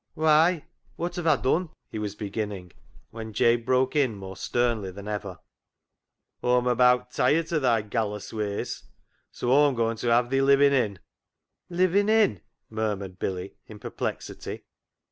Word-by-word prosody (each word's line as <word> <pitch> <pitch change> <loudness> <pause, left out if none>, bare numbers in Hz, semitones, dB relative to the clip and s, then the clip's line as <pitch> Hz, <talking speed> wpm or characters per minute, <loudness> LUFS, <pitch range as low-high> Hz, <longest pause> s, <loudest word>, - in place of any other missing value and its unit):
" - - -53
Why, 160 +1 +3 0.3
wot 175 +1 -3
have 175 -2 -2
Aw 155 - +6
dun? 160 +7 0
" - - -51
he 110 - -4
was 105 -1 -4
begin 105 0 -3
ning, 90 -4 -9 0.4
when 110 -1 -8
Jabe 120 +2 +3
broke 130 +3 +1
in 135 -7 +2
more 95 -1 -8
sternly 115 -2 -1
than 100 +2 -9
ever 100 -3 -4 0.3
— - - -59
" - - -51
Aw'm 125 0 +2
abaat 125 0 +3
tiret 165 +5 +1
o' 155 - +3
thy 120 -5 +2
gallus 105 -1 -3
ways, 105 -2 -3 0.5
so 120 - -2
Aw'm 145 0 +5
goin' 115 -1 0
ta 120 - -4
have 120 +1 +3
thi 135 0 +2
livin' 140 +1 +5
in." 110 -7 +1 0.4
" - - -60 0.3
Livin' 185 +3 +2
in? 215 - +3
" - - -54
murmured 100 -4 -3
Billy 95 0 -4
in 110 - -11
perplexity. - - -5
120 Hz, 175 wpm, -26 LUFS, 105-140 Hz, 0.5 s, Aw